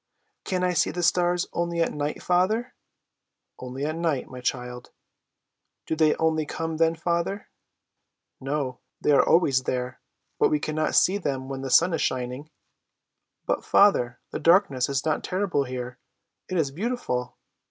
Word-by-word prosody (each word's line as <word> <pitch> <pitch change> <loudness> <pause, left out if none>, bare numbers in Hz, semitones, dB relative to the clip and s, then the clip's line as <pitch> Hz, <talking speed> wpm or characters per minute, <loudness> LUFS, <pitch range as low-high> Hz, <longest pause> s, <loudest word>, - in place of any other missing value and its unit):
"Can 185 -2 -1
I 180 0 +2
see 165 -2 +2
the 175 - -3
stars 175 0 +2
only 170 0 -1
at 165 - +1
night, 150 0 -3
father?" 210 +8 +1 0.9
"Only 130 +2 -5
at 155 +1 -2
night, 165 -5 -1
my 125 -1 -9
child!" 125 0 -4 1.0
"Do - - -1
they 155 -1 +3
only 160 -1 +1
come 160 0 -3
then, 165 0 +3
father?" 170 +4 -2 0.9
"No; 135 -2 -3 0.2
they - - +2
are 140 - +6
always 140 -6 +3
there, 125 0 -3 0.4
but - - +4
we 150 - +1
cannot 155 +1 -1
see 195 +3 +4
them 135 -6 -3
when 135 -1 -5
the 135 - -4
sun 170 +6 +5
is 165 - 0
shining." 130 +3 -2 1.0
"But, - - -1
father, 125 -12 +3
the - - -4
darkness 165 -8 +3
is 140 +1 -1
not 155 -1 0
terrible 185 -7 0
here, 125 0 -6 0.5
it 185 - -1
is 145 -5 +1
beautiful!" 155 - -3
155 Hz, 155 wpm, -25 LUFS, 130-175 Hz, 1.0 s, are